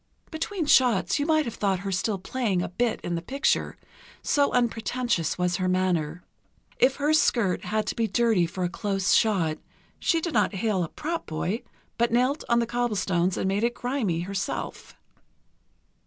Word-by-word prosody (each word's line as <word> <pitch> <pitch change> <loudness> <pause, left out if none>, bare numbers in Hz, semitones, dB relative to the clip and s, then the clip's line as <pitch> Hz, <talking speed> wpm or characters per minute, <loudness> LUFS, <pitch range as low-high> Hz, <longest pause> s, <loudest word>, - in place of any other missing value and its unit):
Between 325 +2 -3
shots 225 - +3
you 290 - 0
might 310 -2 +3
have 235 - -4
thought 195 -3 0
her 195 0 -3
still 195 +3 0
playing 190 -2 -1
a - - -2
bit 235 +6 -1
in 175 - -3
the 170 - -2
picture, 275 - 0 0.5
so 285 -1 +2
unpretentious 235 -6 0
was 180 0 0
her 185 -1 0
manner. 180 -3 0 0.6
If 265 +1 +4
her 295 +2 +1
skirt 235 -11 +2
had 215 0 -1
to - - -3
be 230 -1 0
dirty 215 -4 +2
for 180 +2 -4
a - - +2
close 195 +1 0
shot, 170 -8 +2 0.4
she 330 - +2
did 330 0 -3
not 210 -3 +2
hail 195 -2 0
a 165 - -4
prop 330 +2 -4
boy, 175 +8 -2 0.4
but 235 0 +2
knelt 255 +6 +1
on 235 - +4
the 235 - +2
cobblestones 200 -7 0
and - - -1
made 195 +3 0
it 240 +1 +1
grimy 245 -10 -1
herself.... 195 +2 -4
215 Hz, 175 wpm, -26 LUFS, 185-245 Hz, 0.6 s, If